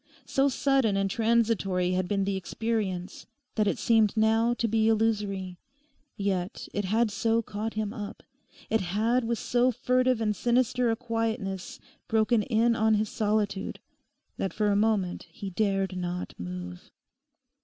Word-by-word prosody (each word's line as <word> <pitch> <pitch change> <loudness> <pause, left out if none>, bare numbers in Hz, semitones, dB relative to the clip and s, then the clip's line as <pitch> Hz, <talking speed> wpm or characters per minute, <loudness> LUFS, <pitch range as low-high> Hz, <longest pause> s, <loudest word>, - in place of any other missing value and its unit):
So 275 +1 +2
sudden 265 -6 +2
and 195 -1 0
transitory 220 -6 +1
had 185 0 0
been 200 0 0
the 195 0 -1
experience 190 -2 -3 0.3
that 215 -2 +1
it - - +1
seemed 220 -2 +3
now 225 +2 +3
to 235 - 0
be 220 0 +2
illusory; 205 -5 0 0.6
yet 195 -2 -2
it 205 -1 -1
had 220 +3 +2
so 225 +3 +1
caught 210 +1 -4
him 215 -1 -2
up, 205 -3 -7 0.5
it 225 - +3
had 220 +7 +1
with 235 0 0
so 245 +3 +2
furtive 255 +1 +1
and 210 -2 0
sinister 245 +1 +2
a 225 - +2
quietness 225 -5 -3 0.3
broken 220 0 +3
in 230 +2 +2
on 220 -1 +3
his 210 0 0
solitude, 210 -3 -1 0.6
that 195 - -2
for 210 -1 +1
a - - +2
moment 205 -4 0
he 200 -5 -7
dared 195 -1 0
not 180 0 -4
move. 90 0 -7
215 Hz, 150 wpm, -28 LUFS, 195-230 Hz, 0.6 s, seemed